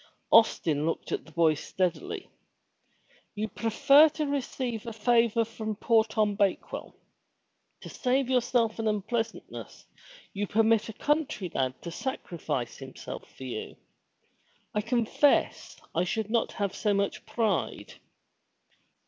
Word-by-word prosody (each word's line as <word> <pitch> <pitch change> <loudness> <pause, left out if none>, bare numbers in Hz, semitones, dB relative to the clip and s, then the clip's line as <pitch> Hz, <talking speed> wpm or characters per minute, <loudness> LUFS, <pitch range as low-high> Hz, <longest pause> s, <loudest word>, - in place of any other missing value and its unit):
Austin 160 -9 +4
looked 165 - -3
at - - -2
the 160 - -15
boy 160 -1 +4
steadily. 180 +3 -3 1.1
"You 215 +1 -2
prefer 275 +8 +5
to 305 0 -3
receive 255 -5 -3
a 230 - -4
favor 230 0 +3
from 220 -1 -5
poor 225 +1 +3
Tom 215 -1 0
Bakewell? 200 -1 -1 0.9
To - - -9
save 260 0 0
yourself 245 -3 +1
an 225 - 0
unpleasant 215 +2 -2
ness - - -10 0.5
you 205 +1 -2
permit 225 +1 +3
a - - -6
country 290 - -1
lad 130 -1 -1
to 170 - -5
sacrifice 165 - -4
himself 135 -1 -9
for - - -9
you. 125 -4 -5 1.0
I 210 - +1
confess 235 +5 +1
I 170 - +2
should 215 +3 -2
not 230 -1 +1
have 200 -3 -2
so 210 -3 +1
much 200 0 -1
pride." 215 -7 -1
220 Hz, 130 wpm, -28 LUFS, 195-240 Hz, 1.1 s, prefer